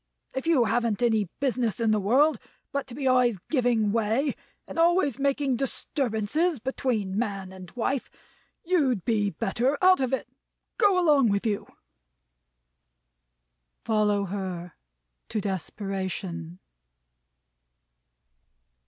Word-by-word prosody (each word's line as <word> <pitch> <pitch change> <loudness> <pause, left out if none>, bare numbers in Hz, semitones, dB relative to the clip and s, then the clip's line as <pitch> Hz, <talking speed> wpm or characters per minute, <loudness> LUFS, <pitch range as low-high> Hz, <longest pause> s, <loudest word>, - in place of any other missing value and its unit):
If 265 +3 -4
you 310 -7 +4
haven't 230 0 0
any 220 -3 +3
business 250 -5 0
in 225 -2 +2
the 215 - +3
world, 260 +7 +3 0.3
but 280 0 -2
to 240 - -8
be 275 0 -4
always 250 -4 +3
giving 240 -7 +2
way, 230 +6 +1 0.3
and - - -5
always 335 - +3
making 275 -2 +1
disturbances 270 - 0
between 225 -5 -2
man 195 -5 -3
and 185 -1 -10
wife, 250 +2 -1 0.5
you'd 280 - +1
be 210 -3 +1
better 235 - 0
out 370 0 +5
of 260 -2 0
it. 265 - -1 0.5
Go 405 -4 +4
along 295 -9 +4
with 200 +1 0
you!" 210 -3 -1 2.2
"Follow 210 -2 +1
her! 185 -3 -5 0.6
To 220 - -1
desperation!" 190 -3 -4
235 Hz, 115 wpm, -26 LUFS, 205-275 Hz, 2.2 s, out